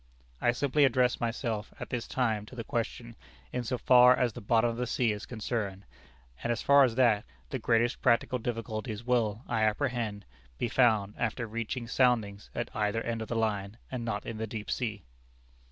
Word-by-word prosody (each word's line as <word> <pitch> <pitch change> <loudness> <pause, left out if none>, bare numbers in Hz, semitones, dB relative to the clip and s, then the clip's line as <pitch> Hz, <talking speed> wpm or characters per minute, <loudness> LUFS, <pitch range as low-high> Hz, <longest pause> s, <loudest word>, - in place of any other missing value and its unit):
"I 120 - +4
simply 140 +4 +2
address 125 -2 +3
myself 115 -2 -2
at - - -7
this 120 -2 -3
time 110 -5 -1
to 130 - -11
the 115 - -4
question 120 -1 -4 0.4
in 125 - -1
so 125 +2 -2
far 125 0 +7
as 120 -3 +1
the - - -8
bottom 115 +3 +2
of 115 - -7
the 125 0 -2
sea 120 -2 +1
is 105 +1 -5
concerned, 105 -4 -3 0.6
and 120 - -1
as 115 - -2
far 140 0 +7
as 120 -4 +2
that, 115 -5 +4 0.3
the - - -2
greatest 120 +1 +1
practical 125 +1 +2
difficulties 115 -1 -4
will, 115 -2 +1
I 110 - 0
apprehend, 110 -2 -1 0.3
be 120 - -1
found 110 -5 +3
after 115 +1 -1
reaching 115 +2 -4
soundings 115 -5 +1
at 120 - -4
either 105 +1 0
end 115 -1 -3
of 110 - -5
the 120 - -3
line, 105 -2 -1
and 125 -2 -3
not 105 -3 -3
in 115 - -5
the 110 - -2
deep 110 0 -5
sea.... 105 -6 -2
115 Hz, 190 wpm, -30 LUFS, 110-125 Hz, 0.6 s, far